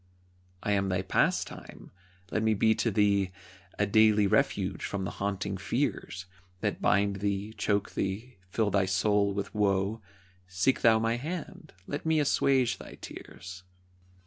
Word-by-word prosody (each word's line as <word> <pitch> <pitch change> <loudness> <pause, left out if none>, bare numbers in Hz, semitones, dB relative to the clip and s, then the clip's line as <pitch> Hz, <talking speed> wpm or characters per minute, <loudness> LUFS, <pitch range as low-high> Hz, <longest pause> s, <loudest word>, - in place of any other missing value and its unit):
I 105 - 0
am 100 -1 +1
thy 90 0 0
Pastime. 95 - -1 0.4
Let 110 - 0
me 110 0 +2
be 110 +2 +4
to 110 +2 0
thee 100 -2 +2 0.5
A 105 - +2
daily 105 0 +5
refuge 100 - +1
from 100 -1 -3
the 95 - -3
haunting 100 -1 -2
fears 95 +1 -2 0.4
That - - -2
bind 100 -1 +2
thee, 100 +2 -2
choke 105 -1 0
thee, 105 +4 -4
fill 105 +1 0
thy 100 -1 +3
soul 100 +2 +2
with 100 0 -4
woe. 100 +1 +1 0.5
Seek 95 +8 +1
thou 115 -1 +6
my 115 +1 0
hand, 160 +6 -6
let 145 - -4
me 160 -1 +2
assuage 135 -3 +2
thy - - -10
tears. 90 +1 -10
100 Hz, 145 wpm, -29 LUFS, 95-110 Hz, 0.5 s, thou